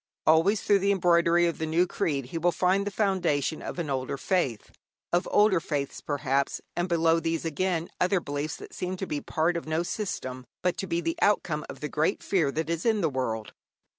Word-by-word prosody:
Always 165 +7 +4
through 200 -1 +4
the 200 +1 +2
embroidery 175 -2 +4
of 170 - -1
the 160 - -1
new 165 +3 +3
creed 140 -6 -1
he 165 - -1
will 175 +2 +3
find 190 +3 +1
the - - -2
foundation 185 -8 0
of - - -6
an 170 -3 -2
older 135 0 -2
faith, 135 - -1 0.4
of 175 - +2
older 205 -3 +4
faiths, 145 -4 -3
perhaps, 140 -1 0 0.2
and 175 +1 -1
below 165 -1 +3
these, 165 0 -2
again, 165 +1 -1
other 185 +1 +3
beliefs 145 -1 -3
that - - -11
seem 185 +1 -3
to 190 - -3
be 150 -5 -3
part 165 +2 0
of 170 - -4
no 160 +2 0
system, 130 - -4 0.2
but 180 -1 +2
to 195 - -3
be 170 0 0
the 165 0 -2
outcome 165 -7 +2
of - - -9
the 150 - -2
great 155 +5 0
fear 165 -8 +1
that 160 +2 -2
is 170 0 -2
in 220 -3 +2
the 160 -4 +1
world. 115 -5 -3
165 Hz, 210 wpm, -27 LUFS, 150-180 Hz, 0.4 s, Always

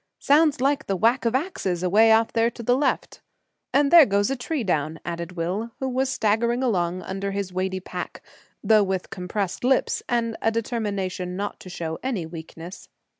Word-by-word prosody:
"Sounds 295 0 +3
like 280 +3 +1
the 195 - 0
whack 235 +7 +2
of 230 +1 +1
axes 200 - -2
away 215 +5 +5
off 225 0 +3
there 230 0 +3
to 235 0 -10
the 245 +2 +3
left!" 270 -1 -1 0.5
"And 280 0 +3
there 335 -4 +9
goes 200 +3 +1
a - - 0
tree 270 +2 -3
down!" 160 -4 -1
added 170 +1 -5
Will, 185 +7 -3
who 265 - -2
was 260 +1 0
staggering 235 +2 +1
along 180 -6 0
under 195 +1 -4
his 195 -2 -4
weighty 185 +1 -1
pack, 185 - -7 0.4
though 220 -1 +5
with 190 -2 -2
compressed 195 0 -3
lips, 260 +1 +2
and 230 -2 0
a 225 - +3
determination 200 -6 -3
not 205 +2 -4
to 185 - -11
show 160 -2 -5
any 235 -10 -2
weakness. 165 +2 -10
215 Hz, 180 wpm, -24 LUFS, 185-245 Hz, 0.5 s, there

